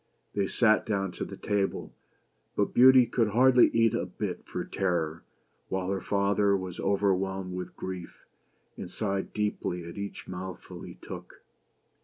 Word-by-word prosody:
They 100 -1 0
sat 110 0 +3
down 95 -3 0
to - - -5
table, 100 -1 -1 0.6
but 100 - 0
Beauty 130 0 +8
could 115 -1 +1
hardly 125 +4 +6
eat 115 -1 +3
a - - -1
bit - - -4
for - - -4
terror, 85 -4 -1 0.5
while 95 0 -1
her 95 -2 -1
father 100 0 +2
was 95 -2 -6
overwhelmed 95 -1 0
with 90 0 -6
grief, 90 -2 -7 0.5
and - - -7
sighed 100 0 -2
deeply 105 -4 -2
at 85 - -8
each 100 0 -6
mouthful 95 0 -7
he - - -9
took. - - -10
100 Hz, 145 wpm, -29 LUFS, 95-105 Hz, 0.6 s, Beauty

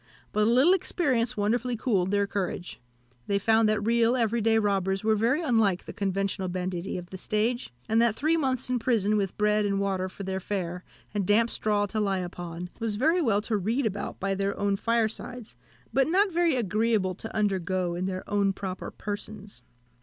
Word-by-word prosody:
But 210 0 +2
a - - +4
little 260 +10 +5
experience 255 - 0
wonderfully 235 +4 0
cooled 200 -6 +1
their 200 0 +2
courage; 190 -6 -4 0.5
they 200 - +2
found 220 +2 +3
that 215 -1 0
real, 235 +1 +3
everyday 225 -1 +2
robbers 195 -2 0
were 220 0 +3
very 240 +10 +1
unlike 225 - +2
the - - -8
conventional 195 -1 -1
banditti 180 0 -3
of 180 0 -8
the 190 - -7
stage, 225 +5 -1 0.2
and 225 +1 +3
that 235 -2 +3
three 310 +6 +2
months 260 -5 0
in 250 -1 0
prison, 220 -3 +1
with 195 -3 -1
bread 210 0 +2
and 200 -1 0
water 190 -2 -1
for 200 - -8
their 190 0 -2
fare, 180 -2 -4 0.3
and 200 -3 -1
damp 225 +3 +3
straw 210 -1 +1
to 215 +2 -3
lie 195 -2 +1
upon, 175 -1 -6
was 225 -2 -1
very 320 - +2
well 210 -8 +2
to 220 +1 -1
read 225 +7 0
about 205 -1 -3
by 195 0 0
their 195 +1 -1
own 200 -1 +1
firesides, 230 +2 -2 0.4
but 270 0 +3
not 385 +4 +3
very 340 -3 +2
agreeable 215 -3 +1
to 225 +5 -9
undergo 185 -4 0
in 180 +2 -2
their 185 -1 -5
own 200 -1 +1
proper 190 -1 -5
persons. 205 - -6
210 Hz, 190 wpm, -27 LUFS, 195-230 Hz, 0.5 s, little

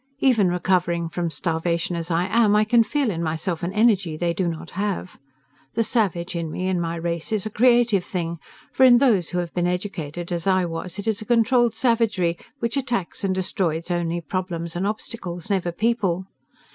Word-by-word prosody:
Even 230 -9 +3
recovering 175 -1 0
from 170 0 -2
starvation 170 +1 -1
as 165 0 -4
I 170 +1 +1
am, 210 +1 +3
I 210 - +5
can 230 +2 +4
feel 275 -1 0
in 165 -3 -3
myself 160 +1 -2
an 175 - -2
energy 200 -6 +2
they 170 +1 0
do 180 +1 -1
not 165 0 -5
have. 195 -2 -3 0.6
The 230 - +2
savage 190 -7 0
in 165 -2 -2
me 185 +4 -3
and 180 -2 0
my 165 0 -2
race 170 +1 -3
is 215 -2 0
a 215 - -4
creative 235 -4 +4
thing, 170 -2 -4 0.3
for 265 - +3
in 250 -2 +8
those 220 -10 +3
who 180 - -3
have 175 -2 -3
been 175 0 0
educated 175 -3 -4
as 170 +1 -2
I 185 -1 +3
was 170 +2 -5
it 200 - -5
is 220 -1 0
a - - -7
controlled 240 0 +3
savagery 225 -8 +1 0.2
which 235 +1 -2
attacks 240 -11 -2
and 190 -1 +1
destroys 180 -2 -1
only 175 0 -1
problems 170 -2 -4
and 185 +3 0
obstacles, 210 -3 -5
never 185 -3 0
people. 190 -3 0
185 Hz, 195 wpm, -23 LUFS, 170-215 Hz, 0.6 s, in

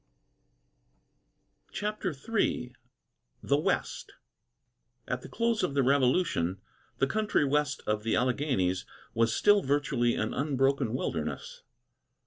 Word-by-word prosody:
CHAPTER 210 -2 -2
III 140 - -1 0.7
THE - - +2
WEST - - -2 0.9
At 125 0 -2
the - - -10
close 230 -1 0
of 140 - -1
the 140 - +3
Revolution, 130 - +2 0.4
the - - +3
country 210 0 +1
west 145 0 0
of 105 0 0
the 115 +1 0
Alleghanies 125 -9 0 0.3
was 115 0 +2
still 205 - +4
virtually 140 -5 +1
an 110 - -2
unbroken 135 -4 +1
wilderness. 80 - -4
135 Hz, 110 wpm, -29 LUFS, 120-150 Hz, 0.9 s, still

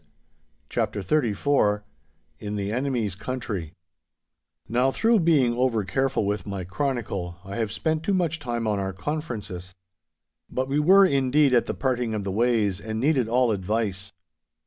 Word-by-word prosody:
*CHAPTER 100 - -2
XXXIV* 110 -4 +1 0.6
*IN 105 0 -4
THE 100 0 -2
ENEMY'S 120 -5 -1
COUNTRY* 100 -6 -5 0.9
Now, 125 +4 +2
through 225 - +3
being 150 -8 +3
over 120 -4 +1
careful 135 +4 0
with 100 -2 -2
my 100 -2 -4
chronicle, 95 -4 -3
I 95 +3 -6
have 110 -3 -1
spent 160 +6 -1
too 195 +4 0
much 165 -3 0
time 120 -4 -3
on 105 -2 0
our 95 0 -2
conferences. 105 - -5 0.7
But 130 +1 -2
we 140 +2 +1
were, 190 +6 +7
indeed, 140 -2 +3
at 120 - +3
the - - -2
parting 125 -4 -1
of 105 - -2
the 95 - -3
ways, 105 -3 +1
and 110 0 -4
needed 135 -2 +2
all 125 0 +3
advice. 100 -1 -1
120 Hz, 150 wpm, -25 LUFS, 100-135 Hz, 0.9 s, were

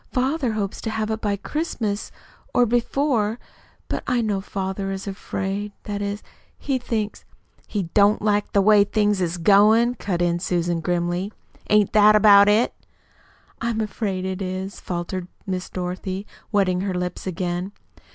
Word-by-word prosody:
Father 260 -1 0
hopes 200 -2 -3
to 225 - -3
have 220 0 -2
it 220 - -3
by 205 -1 0
Christmas, 220 - -3 0.4
or 245 - +5
before; 240 -1 +1 0.5
but - - -2
I 250 -1 +2
know 205 -3 -1
father 195 0 -3
is 195 0 -5
afraid 200 +1 -4
that 205 -1 -4
is 205 0 -3 0.3
he 270 -3 -1
thinks 220 -4 -3 0.2
" - - -35
"He 205 -3 -2
don't 205 +1 +5
like 205 -1 0
the 200 - +3
way 210 0 +6
things 205 -1 +1
is 175 0 -1
goin'," 210 +6 +5
cut 195 -7 -3
in 175 -1 +1
Susan 175 -1 0
grimly. 175 +3 -1 0.4
"Ain't 210 -1 +4
that 215 0 +7
about 205 -1 +7
it?" 215 +4 +3 0.9
"I'm 230 -1 -1
afraid 200 -3 -2
it 190 +1 -3
is," 190 +1 -4
faltered 175 +1 -4 0.2
Miss 185 -2 -3
Dorothy, 185 +2 -4 0.3
wetting 185 -4 +2
her 190 -1 -2
lips 180 +1 -4
again. 180 +1 -2
200 Hz, 155 wpm, -23 LUFS, 185-215 Hz, 0.9 s, that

